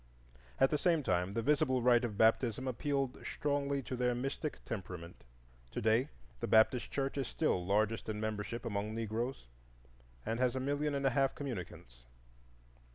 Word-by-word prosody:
At 135 - +5
the 150 - +1
same 165 -2 +2
time, 90 -1 0
the 115 - 0
visible 140 -3 +2
rite 120 0 +5
of 110 -4 -3
baptism 115 +3 +3
appealed 135 +1 -1
strongly 140 -1 -1
to 130 - -4
their 125 0 +1
mystic 135 +4 -3
temperament. 90 -5 -6 0.5
To - - -2
day 115 +6 +2 0.3
the - - -2
Baptist 110 +3 +4
Church 135 0 -2
is 135 - -1
still 150 - 0
largest 105 +4 +1
in 105 -1 -2
membership 110 +2 -3
among 105 0 -2
Negroes, 115 - -3 0.8
and 115 +1 -1
has 125 0 +2
a - - 0
million 145 +2 0
and 140 0 -1
a 135 - +4
half 135 +2 +2
communicants. 90 - -6
125 Hz, 160 wpm, -34 LUFS, 110-135 Hz, 0.8 s, At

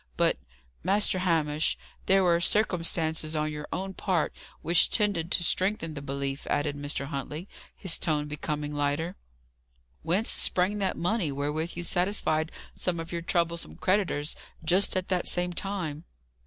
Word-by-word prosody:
But, - - +3 0.4
Master 190 +1 +2
Hamish, 160 -4 +1 0.3
there 195 0 +5
were 170 -1 +3
circumstances 165 -5 +1
on 155 0 0
your 150 0 -6
own 190 +2 -3
part 185 -4 0 0.3
which 165 +2 +5
tended 195 -6 +1
to 175 - +2
strengthen 185 -2 +1
the 145 - -6
belief," 140 0 -3
added 145 0 0
Mr. 145 -1 -2
Huntley, 145 +5 -5 0.3
his 185 -4 -2
tone 150 -2 +1
becoming 150 0 -3
lighter. 145 +5 -1 0.9
"Whence 190 +7 +2
sprang 185 +3 +3
that 195 -2 0
money 175 -3 0
wherewith 150 +4 -2
you 175 - -3
satisfied 175 -4 +1 0.2
some 175 -2 +1
of 165 0 -6
your 170 -1 -2
troublesome 170 - 0
creditors, 185 - +1 0.3
just 185 +4 +3
at 185 - -2
that 180 -2 0
same 180 0 0
time?" 175 -5 -3
165 Hz, 145 wpm, -28 LUFS, 150-185 Hz, 0.9 s, there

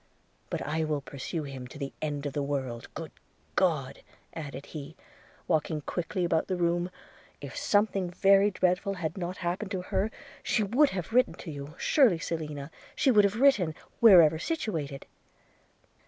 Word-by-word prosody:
But - - -3
I 160 +2 -1
will 150 -2 -1
pursue 145 +4 -5
him 135 -3 -7
to 130 - -11
the 140 -1 -5
end 150 -2 -3
of 145 - -3
the 145 - -1
world 130 -4 -3
– - - -37
Good - - -6 0.4
God!' - - +1 0.3
added 140 -4 -7
he, 155 0 -8 0.5
walking 155 -2 0
quickly 175 +4 -2
about 165 -2 +1
the 185 - -1
room, 175 0 +1 0.5
'if - - -8
something 205 -3 +1
very 195 +3 +5
dreadful 185 +1 0
had 160 -3 -3
not 180 -1 -4
happened 185 +4 -2
to 190 -3 -3
her, 195 +3 0 0.3
she 220 - +1
would 260 +9 +4
have 190 +3 -5
written 250 +1 +3
to 165 - -8
you 145 +2 -8
– - - -24
surely, 250 - +4
Selina, 150 -3 -5 0.2
she 265 - +3
would 210 -3 +6
have 200 +3 0
written, 210 - +4 0.2
wherever 170 -8 +7
situated.' 160 - -3
170 Hz, 170 wpm, -29 LUFS, 150-195 Hz, 0.5 s, wherever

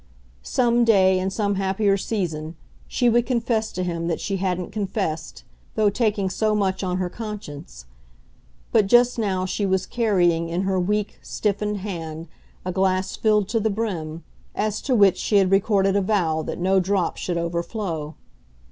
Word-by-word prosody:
Some 240 -1 +2
day 190 -5 +4
in 185 +1 -1
some 200 0 -1
happier 195 +1 +2
season, 170 -6 -3 0.3
she 245 - +1
would 235 0 +3
confess 235 -3 0
to 185 - -2
him 170 -1 -2
that 170 - -1
she 195 -2 -2
hadn't 180 -1 -2
confessed, 195 -6 -3 0.3
though 210 -2 +3
taking 205 -3 0
so 215 +3 0
much 195 -2 0
on 180 -1 -1
her 185 -1 -1
conscience; 175 - -8 0.9
but 205 - +4
just 240 +3 +4
now 190 -4 0
she 195 +2 -2
was 190 -1 +1
carrying 175 -8 +1
in 175 +3 -1
her 190 -1 0
weak, 210 +3 -1
stiffened 210 -1 -2
hand 165 -4 -5 0.4
a 185 - -1
glass 190 0 0
filled 210 -3 +2
to 225 - +1
the 220 0 +1
brim, 175 -7 -3 0.3
as 215 0 -1
to 260 - 0
which 195 -4 +5
she 210 - 0
had 190 -1 +3
recorded 195 0 +3
a 200 - +3
vow 180 -6 +1
that - - -5
no 190 +2 +2
drop 190 -1 0
should 175 -2 -2
overflow. 170 -2 -3
195 Hz, 165 wpm, -23 LUFS, 180-210 Hz, 0.9 s, which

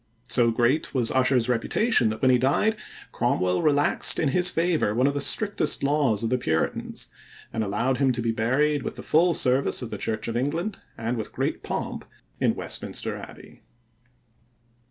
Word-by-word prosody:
So 115 0 +4
great 120 +7 0
was 120 -3 +2
Ussher's 130 -2 +2
reputation 125 - +2
that 110 +3 -6
when 130 - +5
he 125 - +4
died 145 - +2 0.4
Cromwell 90 0 0
relaxed 145 -2 +3
in 150 - +1
his 180 +5 +2
favor 165 -11 0
one 125 +2 +2
of 140 - +2
the 145 - -2
strictest 205 +3 0
laws 140 -6 +1
of 115 - -1
the 125 - +1
Puritans 80 -8 -2 0.4
and 110 - -1
allowed 115 +6 -1
him 135 0 +2
to 120 - -3
be 115 - +1
buried 130 +6 +1
with - - -5
the - - -9
full 170 +2 +3
service 130 0 +2
of 115 - -7
the - - -5
Church 110 -1 -2
of 115 - -3
England, 165 - -2 0.2
and 115 +2 -3
with 110 - -5
great - - -3
pomp, - - -4 0.4
in - - +1
Westminster - - -4
Abbey. - - -12
130 Hz, 175 wpm, -25 LUFS, 115-150 Hz, 0.4 s, when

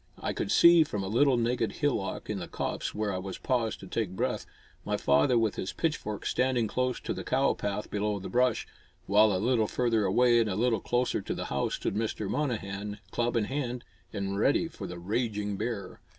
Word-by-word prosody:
I - - -3
could - - -2
see, 170 -1 +7
from 105 -9 -4
a - - -3
little 125 +5 +3
naked 115 -2 0
hillock 140 -10 -1
in 105 -2 -3
the 85 - -5
copse - - -3
where 105 -1 -1
I 95 - -3 0.2
paused 120 -4 0
to 95 - -9
take 95 -2 -2
breath, - - -2 0.4
my - - -1
father 70 - +3
with 110 -2 +1
his 95 - -3
pitchfork 105 -10 -2
standing 125 -3 +1
close 125 +3 -1
to - - -3
the - - -6
cow 135 +2 +2
path 105 +1 -4
below 105 0 0
the 95 - -6
brush, 125 +1 +1 0.4
while 105 +2 +5
a 95 - +1
little 110 +2 +2
further 115 -3 +1
away 120 +5 +4
and 115 -2 +2
a 95 - -1
little 115 0 +1
closer 125 +1 0
to - - -4
the - - -4
house - - 0
stood - - -2
Mr. 110 -1 -2
Monnehan, 105 -6 -2
club 120 0 0
in 115 - +2
hand 125 0 -3 0.3
and 100 0 -3
ready 145 +8 +3
for 105 - -8
the 90 0 -7
raging 105 +2 -2
bear. 100 -3 -4
110 Hz, 205 wpm, -29 LUFS, 100-125 Hz, 0.4 s, see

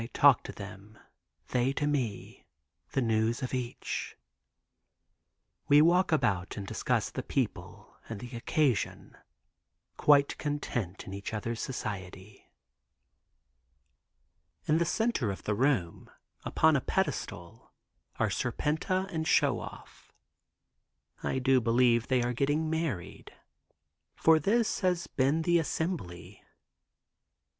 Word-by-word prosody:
I - - -6
talk 140 -4 +6
to - - -5
them; 100 +1 -10 0.5
they 125 +2 +1
to 145 - -1
me, 130 -9 -3 0.5
the 135 - +1
news 115 +1 +1
of 130 - -4
each. 125 -2 -4 1.5
We 145 - +7
walk 175 +4 +4
about 100 - 0
and 100 - -4
discuss - - -1
the - - -4
people - - -4
and 110 -3 -5
the 120 +2 -8
occasion, 130 +1 -1 0.8
quite 140 -1 +4
content 120 - -3
in 95 - -8
each 100 +2 -5
other's 115 +2 -3
society. 100 -5 -6 2.2
In 155 +2 +3
the 170 - +2
center 220 - 0
of 95 - -5
the 105 - 0
room, 110 -8 0 0.4
upon 160 -1 +3
a 135 - +2
pedestal 115 - -3 0.5
are - - +1
Serpenta 185 +5 -1
and 160 0 -2
Show - - +3
Off. - - -11 1.1
I - - -1
do 130 0 +3
believe 120 0 +3
they 130 -1 +2
have 120 0 -2
been 150 +4 +1
married, 160 - -4 0.8
for 160 -1 +5
this 215 +7 +1
has 180 -2 +1
been 140 +5 +1
the 175 +1 +3
assembly. 160 - -4
130 Hz, 115 wpm, -30 LUFS, 110-155 Hz, 2.2 s, We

